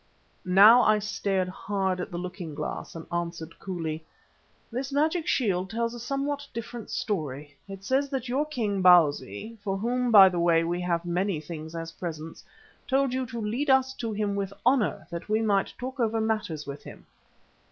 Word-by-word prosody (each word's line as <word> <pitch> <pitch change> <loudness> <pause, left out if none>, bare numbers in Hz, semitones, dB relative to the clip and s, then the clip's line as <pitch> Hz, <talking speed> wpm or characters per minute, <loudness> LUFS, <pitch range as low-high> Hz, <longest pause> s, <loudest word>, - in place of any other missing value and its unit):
Now 205 +7 +8
I 215 -2 +4
stared 200 -2 -1
hard 190 0 -2
at 180 - -4
the 175 - -5
looking 175 -3 -6
glass 150 +2 -5
and 165 - -7
answered 170 -1 -4
coolly: 165 -4 -4 0.7
"This 260 +4 -3
magic 315 +4 +1
shield 190 -6 +1
tells 230 +1 -2
a 240 - -7
somewhat 280 +3 -3
different 230 -1 -6
story. 145 -7 -3
It 195 -1 -9
says 270 +5 +1
that 265 -2 -3
your 275 +5 0
king, 215 -9 -1
Bausi, 175 - +3
for 195 -2 -1
whom 245 +4 0
by 200 -4 +9
the 180 -2 -1
way 170 -1 +4
we 175 +1 -2
have 175 -1 -1
many 180 0 0
things 160 +1 -8
as 165 0 -5
presents, 165 -2 -7 0.4
told 270 -1 +2
you 260 -1 -1
to 235 -1 -6
lead 235 +7 -2
us 265 0 +4
to 230 -2 -3
him 205 -1 -1
with 200 -1 -2
honour, 250 -3 +2
that 170 +4 -6
we 215 +1 +2
might 205 -3 +1
talk 260 +2 -6
over 225 -1 +1
matters 215 -9 -2
with 140 0 -7
him." - - -12
200 Hz, 180 wpm, -27 LUFS, 175-240 Hz, 0.7 s, by